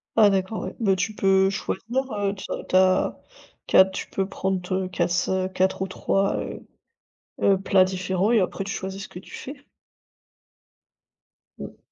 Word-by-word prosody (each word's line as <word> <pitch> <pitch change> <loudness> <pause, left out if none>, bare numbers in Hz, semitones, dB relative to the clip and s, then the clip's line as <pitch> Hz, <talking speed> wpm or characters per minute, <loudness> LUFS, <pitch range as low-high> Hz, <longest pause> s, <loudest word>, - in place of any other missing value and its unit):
Ah, 215 -2 +7
d'accord, 195 +2 -1
ouais, - - -6
bah, 195 -5 +3
tu 215 +4 -2
peux 190 -1 +3
choisir, 220 +3 -4 0.2
heu, 200 -1 -1
tu 190 - -8
as - - -4
tu - - 0
as 185 0 +3 0.5
tu - - +3
as 190 - +9
tu 190 0 -6
peux 195 -1 -1
prendre, 190 -2 -3
heu, 185 0 0
quasse-quatre 185 +1 0
ou 190 - 0
3, 195 +1 0
heu - - -6 0.8
heu, 195 -1 +4
plats 195 -1 +4
différents 185 +2 -1
et 230 - +5
après 190 +1 -2
tu 200 - -4
choisis 190 +1 -5
ce - - -11
que 180 - -10
tu 190 - -13
fais. 280 +1 -9 2.0
Mmh. - - -8
190 Hz, 170 wpm, -24 LUFS, 185-195 Hz, 2.0 s, as